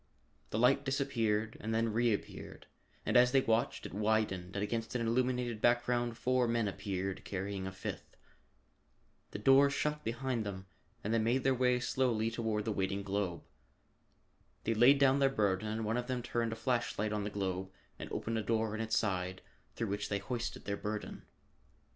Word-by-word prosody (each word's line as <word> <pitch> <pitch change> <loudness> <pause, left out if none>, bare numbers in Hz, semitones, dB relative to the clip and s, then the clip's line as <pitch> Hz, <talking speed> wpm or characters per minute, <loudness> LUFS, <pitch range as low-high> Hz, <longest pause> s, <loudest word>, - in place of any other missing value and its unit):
The - - -2
light 125 +4 +4
disappeared 115 -6 0
and 110 +1 -2
then 115 -1 +1
reappeared, 115 -2 -2 0.4
and - - 0
as 125 0 +7
they 135 0 +5
watched 115 -1 0
it - - -7
widened 105 -3 0
and 100 - -1
against 115 +3 -3
an 115 -2 0
illuminated 125 -1 0
background 120 -1 +2
four 130 -1 +2
men 115 -2 +1
appeared, 95 -1 -3
carrying 95 0 -4
a - - -4
fifth. 95 0 -7 1.1
The - - -6
door 135 +6 +6
shut 150 +1 -1
behind 120 0 -2
them 95 -2 -6 0.4
and 110 - -1
they 115 - +3
made 120 +4 +1
their 135 - +4
way 125 -1 +2
slowly 120 -3 +1
toward 110 -2 -1
the 110 - 0
waiting 100 0 -1
globe. 100 -4 -2 1.2
They 115 - +1
laid 120 +6 +6
down 135 0 +4
their 135 -1 +4
burden 105 -5 0
and 110 +1 -2
one 110 +3 0
of 125 0 -3
them 125 -2 -2
turned 115 -1 -1
a - - -3
flash 120 +1 -1
light 105 +1 0
on 105 -1 -1
the 105 - -2
globe 95 -2 -3 0.3
and - - -7
opened 115 0 -2
a - - 0
door 110 0 0
in 110 - -3
its 110 0 0
side 95 -3 -1 0.3
through 115 -3 -2
which 105 +1 -2
they 100 - 0
hoisted 115 +4 -4
their 100 0 -2
burden. 105 +1 -5
115 Hz, 185 wpm, -33 LUFS, 100-125 Hz, 1.2 s, as